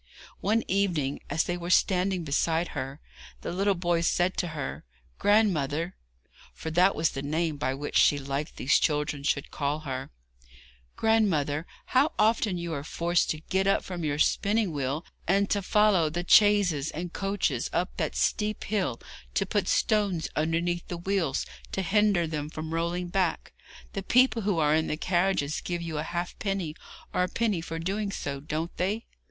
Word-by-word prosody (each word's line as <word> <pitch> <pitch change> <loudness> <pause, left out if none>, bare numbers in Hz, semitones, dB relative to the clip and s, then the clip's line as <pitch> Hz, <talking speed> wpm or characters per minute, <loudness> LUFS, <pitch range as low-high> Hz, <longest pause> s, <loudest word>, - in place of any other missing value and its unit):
One 220 +4 +1
evening, 175 -8 0
as 160 - +1
they 175 - -2
were 175 0 -5
standing 185 -1 +2
beside 160 +3 +1
her, 135 0 -5 0.4
the - - -4
little 195 +2 +1
boy 175 -1 +1
said 175 +2 +1
to 175 - 0
her: 145 - -4 0.4
'Grandmother' 175 -6 +2 0.6
for 160 - -5
that 180 +4 +4
was 160 +1 +1
the 135 - -4
name 155 +2 -1
by 130 -1 -1
which 145 +2 -2
she 145 - +5
liked 140 +2 -3
that - - -27
these 135 - +3
children 150 -1 0
should 140 0 -1
call 145 +1 -1
her 135 -3 -5 0.9
'grandmother, 170 -9 +1 0.2
how 275 +5 +2
often 215 -3 +2
you 170 -1 -4
are 140 -2 -3
forced 170 +3 0
to 155 - -2
get 190 +3 0
up 195 - +3
from 180 -3 -5
your 145 -1 0
spinning 205 +5 +2
wheel, 145 +2 -2 0.2
and 200 +3 +2
to 205 - +2
follow 195 -5 +3
the 175 +3 -3
chaises 190 -7 +5
and 175 +2 -5
coaches 195 - -1
up 180 +2 -1
that - - -2
steep 210 0 0
hill, 190 - -1 0.4
to - - +2
put - - -1
stones 200 -6 +1
underneath 170 +2 0
the 175 - -4
wheels 175 -6 0 0.3
to 195 - -1
hinder 205 -3 +3
them 150 -2 -4
from 155 +1 -6
rolling 170 +2 -1
back! 185 -1 -1 0.4
The 195 - -2
people 245 +3 +4
who 200 -3 0
are 150 -1 +3
in 160 0 +2
the 150 - -2
carriages 175 -4 0
give 175 -1 -3
you 160 -2 -3
a 155 - -4
halfpenny 175 -1 -3 0.4
or - - +1
a 180 - +2
penny 215 -6 0
for 165 0 -5
doing 195 +5 -2
so, 140 -7 -4
don't 155 +4 -4
they?' 205 +5 -1
175 Hz, 175 wpm, -28 LUFS, 155-195 Hz, 0.9 s, she